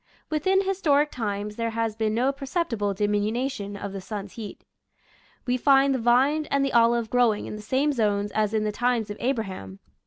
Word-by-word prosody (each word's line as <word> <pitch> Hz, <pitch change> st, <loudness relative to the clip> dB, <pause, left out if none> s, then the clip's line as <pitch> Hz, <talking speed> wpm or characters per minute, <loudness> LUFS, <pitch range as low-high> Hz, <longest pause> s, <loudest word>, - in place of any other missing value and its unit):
Within 375 Hz, +6 st, +2 dB
historic 305 Hz, -7 st, +2 dB
times 210 Hz, -3 st, -4 dB
there 230 Hz, 0 st, -1 dB
has 225 Hz, -1 st, -2 dB
been 220 Hz, -1 st, -1 dB
no 255 Hz, +4 st, +2 dB
perceptible 270 Hz, -, -2 dB
diminu 210 Hz, +6 st, 0 dB
tion 200 Hz, -4 st, -6 dB
of 200 Hz, -1 st, -6 dB
the 195 Hz, -, -5 dB
sun's 200 Hz, 0 st, -6 dB
heat. 220 Hz, -3 st, -9 dB, 0.8 s
We 250 Hz, 0 st, +1 dB
find 275 Hz, +1 st, +4 dB
the 260 Hz, -, -1 dB
vine 265 Hz, +6 st, +3 dB
and 280 Hz, 0 st, +1 dB
the 275 Hz, -, -2 dB
olive 235 Hz, -1 st, +3 dB
growing 240 Hz, -4 st, +2 dB
in -, -, -6 dB
the 215 Hz, -, -8 dB
same 270 Hz, +7 st, +1 dB
zones 205 Hz, -4 st, 0 dB
as 215 Hz, 0 st, 0 dB
in 215 Hz, -, +1 dB
the 210 Hz, -, 0 dB
times 235 Hz, -1 st, 0 dB
of 205 Hz, -, -6 dB
Abraham. 195 Hz, -, -3 dB
230 Hz, 190 wpm, -25 LUFS, 210-270 Hz, 0.8 s, find